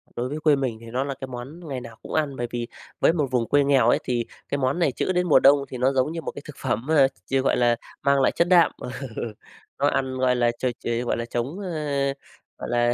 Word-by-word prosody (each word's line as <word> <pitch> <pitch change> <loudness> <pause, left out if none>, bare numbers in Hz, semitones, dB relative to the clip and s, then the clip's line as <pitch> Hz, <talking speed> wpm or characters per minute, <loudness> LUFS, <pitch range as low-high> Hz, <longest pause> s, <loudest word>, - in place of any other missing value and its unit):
Đối 125 +2 -2
với 150 - -4
quê 150 -2 +4
mình 130 -5 -2
thì - - -11
nó 130 +2 0
là 140 - -3
cái 135 0 -7
món 135 +7 -8
ngày 130 -3 -4
nào 115 -2 -10
cũng - - -9
ăn, 150 -3 0
bởi 120 -1 -3
vì 120 -1 -3 0.3
với - - +4
một 150 -5 0
vùng 120 -3 +1
quê 145 0 +4
nghèo 135 -4 +4
ấy - - +3
thì 120 -2 -1 0.2
cái 140 - 0
món 135 +5 0
này 155 -6 +3
trữ 185 - -1
đến 180 0 +1
mùa 155 - +6
đông 140 0 +5
thì 130 - -6
nó 130 +2 +2
giống 130 +4 +1
như 165 - -4
một - - -4
thực 150 - -9
phẩm 120 -2 -2
mà, 145 -4 +5 0.2
ch 135 - 0
gọi - - +2
là 120 -1 +3 0.3
mang 140 0 +3
lại - - +4
chất 170 - +1
đạm. 175 -3 +5
Ừ, - - -5 0.9
nó - - +3
ăn 130 -1 0
gọi 130 -1 +2
là 120 -1 +2
ch 120 - -19 0.2
ch - - -21
ờ, 120 +1 0
gọi - - 0
là, 115 - -3
chống, 120 +10 -3
a, 150 -7 -1 0.4
gọi - - -6
là 120 0 +2
135 Hz, 270 wpm, -24 LUFS, 120-150 Hz, 0.9 s, mùa